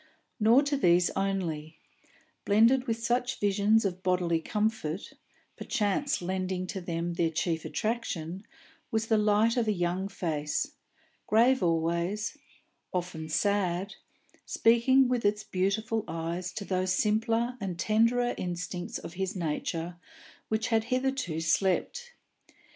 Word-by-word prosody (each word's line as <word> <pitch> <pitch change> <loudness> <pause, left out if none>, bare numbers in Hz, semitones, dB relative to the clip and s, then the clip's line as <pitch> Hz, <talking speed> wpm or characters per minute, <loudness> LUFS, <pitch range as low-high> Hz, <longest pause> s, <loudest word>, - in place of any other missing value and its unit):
Nor 230 +6 +5
to 285 0 0
these 175 -7 +4
only; 170 -6 -2 0.7
blended 230 +5 +4
with 230 0 -2
such 245 +1 0
visions 205 +2 +3
of 185 -1 -2
bodily 180 -3 +1
comfort, 210 -4 -2 0.4
perchance 210 +2 -1
lending 185 0 -2
to 190 +1 -5
them 170 0 -3
their 170 -1 +1
chief 160 0 -2
attraction, 195 -6 -3 0.5
was 220 0 0
the 225 -1 +2
light 210 +3 +3
of 235 -2 +1
a - - +3
young 180 0 -1
face, 160 - -2 0.6
grave 240 +4 +4
always, 170 - 0 0.6
often 175 -3 -4
sad, 195 +2 0 0.5
speaking 245 +3 +4
with 245 -1 0
its 210 +1 +1
beautiful 215 +4 -1
eyes 170 +2 -3
to 200 - -5
those 185 -1 0
simpler 225 +4 +1
and 185 -3 -3
tenderer 230 +5 +2
instincts 180 0 -4
of 170 - -9
his 190 +1 -3
nature 170 0 -3 0.5
which 220 +2 -1
had 225 -2 +2
hitherto 255 - -1
slept. 190 - 0
195 Hz, 125 wpm, -29 LUFS, 175-225 Hz, 0.7 s, Nor